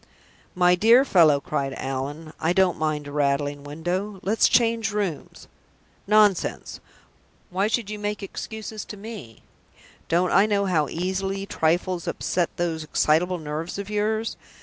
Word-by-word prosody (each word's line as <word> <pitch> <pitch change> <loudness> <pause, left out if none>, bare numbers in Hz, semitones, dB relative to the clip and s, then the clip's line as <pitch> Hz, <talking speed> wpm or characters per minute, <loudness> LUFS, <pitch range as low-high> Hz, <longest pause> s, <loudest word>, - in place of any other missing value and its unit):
"My 180 0 +4
dear 230 +8 +5
fellow!" 160 - +5
cried 140 -2 -3
Allan, 140 +4 -5
"I 165 +2 +1
don't 185 -1 +2
mind 155 -2 -1
a 145 - -8
rattling 145 0 0
window. 175 +7 -4
Let's 215 +3 +3
change 230 -2 +2
rooms. 200 -7 -4 0.6
Nonsense! 210 -3 +2 0.7
Why 195 +3 +1
should 220 -2 -1
you 210 - -5
make 205 0 -3
excuses 220 +1 -6
to 210 - -9
me? 200 - -10 0.7
Don't 175 +2 +2
I 195 +3 +5
know 200 -1 +1
how 160 -6 +1
easily 195 +3 -2
trifles 175 0 0
upset 175 -2 -1
those 165 -2 -2
excitable 165 +4 +1
nerves 155 +2 -5
of 200 +1 -6
yours? 215 +2 -1
180 Hz, 140 wpm, -24 LUFS, 155-210 Hz, 0.7 s, dear